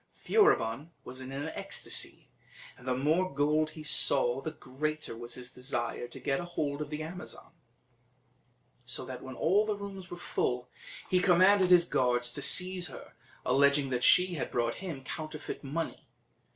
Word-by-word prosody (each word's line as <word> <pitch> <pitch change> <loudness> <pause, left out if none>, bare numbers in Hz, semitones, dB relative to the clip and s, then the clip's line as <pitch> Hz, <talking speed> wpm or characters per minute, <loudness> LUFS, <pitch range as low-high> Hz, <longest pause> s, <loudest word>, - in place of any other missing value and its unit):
Furibon 160 - +2
was 130 +1 -8
in 130 0 -7
an 140 +3 -4
ecstasy, - - -1 0.5
and 125 - -15
the 125 -1 +1
more 160 +7 +2
gold 150 +2 +2
he 155 - -7
saw 135 -4 +2
the 155 - -3
greater 150 0 -4
was 120 +1 -6
his 125 0 -6
desire 120 -2 -3
to 120 - -10
get 135 -1 0
hold 150 -4 -3
of 150 - -4
the 150 0 -4
Amazon; 175 +1 -8 1.3
so 125 - -3
that 130 -1 -7
when 130 -1 -8
all 195 +10 +3
the 215 -1 -1
rooms 195 -3 -8
were 175 - -7
full, 125 -7 -1 0.4
he 185 - +3
commanded 185 +1 +5
his 175 -2 +7
guards 125 -5 +1
to 145 - -4
seize 180 +4 +3
her, - - -9 0.3
alleging 140 +1 +3
she 180 +8 +5
had 155 - -3
brought 120 -1 0
him 160 -8 -6
counterfeit 155 +3 -6
money. 155 +4 -4
150 Hz, 160 wpm, -31 LUFS, 130-175 Hz, 1.3 s, his